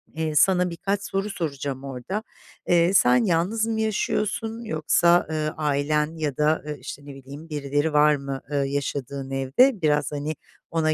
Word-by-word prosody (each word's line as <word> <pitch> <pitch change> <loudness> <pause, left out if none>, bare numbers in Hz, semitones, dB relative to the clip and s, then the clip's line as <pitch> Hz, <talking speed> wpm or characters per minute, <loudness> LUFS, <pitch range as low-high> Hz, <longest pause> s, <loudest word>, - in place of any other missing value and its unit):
Eee, 160 -1 -2
sana 180 +2 +4
birkaç 195 +4 -2
soru 195 +2 -2
soracağım 140 -6 -4
orada. 135 - -5 0.4
Eee, 175 +1 +4
sen 125 -8 +5
yalnız 190 +7 +1
mı 220 -1 -1
yaşıyorsun 220 +1 -1
yoksa, 170 -1 +3
eee, 155 -1 -1
ailen 150 +1 0
ya 150 -4 -2
da, 150 +1 +2
ııı, 150 -1 -4
işte, 145 - -8
ne 140 -1 -9
bileyim, 140 +4 -11
birileri 145 +1 -1
var 150 0 +5
mı, 140 -1 -5
eee, 145 - 0
yaşadığın 140 -1 -3
evde? 160 - +3
Biraz, 150 -1 +1
hani, 150 +1 -3 0.4
ona 160 -1 +1
150 Hz, 160 wpm, -24 LUFS, 140-175 Hz, 0.4 s, sen